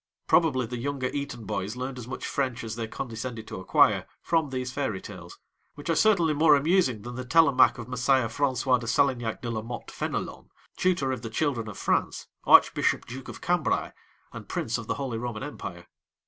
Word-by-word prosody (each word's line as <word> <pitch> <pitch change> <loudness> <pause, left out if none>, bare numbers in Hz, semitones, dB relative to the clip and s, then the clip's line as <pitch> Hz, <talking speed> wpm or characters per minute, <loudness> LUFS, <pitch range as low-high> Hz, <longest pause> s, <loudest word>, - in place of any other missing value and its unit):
Probably 140 -7 +3
the 120 +1 -5
younger 135 0 -2
Eton 140 -6 -4
boys 100 +3 -3
learned 130 +1 -5
as 120 - -8
much 130 - -5
French 130 -4 -2
as 110 -1 -5
they 115 -1 -4
condescended 115 -1 -5
to - - -6
acquire 95 - +3 0.2
from 160 -3 +1
these 130 -1 -3
fairy 115 -9 -2
tales, 90 -4 -10 0.4
which 145 +3 -3
are - - +2
certainly 175 -5 +4
more 150 0 +6
amusing 140 - +2
than 120 +1 -7
the 130 +1 -5
Télémaque 140 0 +5
of 120 -1 -7
Messire 125 0 +2
François 130 +1 +1
de 115 - -7
Salignac 120 -3 +1
de 120 - -2
la 110 -1 -2
Motte 120 +2 -7
Fénelon, - - -4 0.3
tutor 175 -8 +1
of 130 - -3
the 115 - -5
children 120 -2 -1
of 105 - -7
France, - - 0 0.2
Archbishop - - +5
Duke 130 +2 -8
of - - -9
Cambrai, 175 -3 0 0.4
and - - -9
Prince - - -2
of - - -8
the - - -1
Holy 130 -5 -3
Roman 120 0 -4
Empire. 85 -11 -7
125 Hz, 190 wpm, -27 LUFS, 115-140 Hz, 0.4 s, more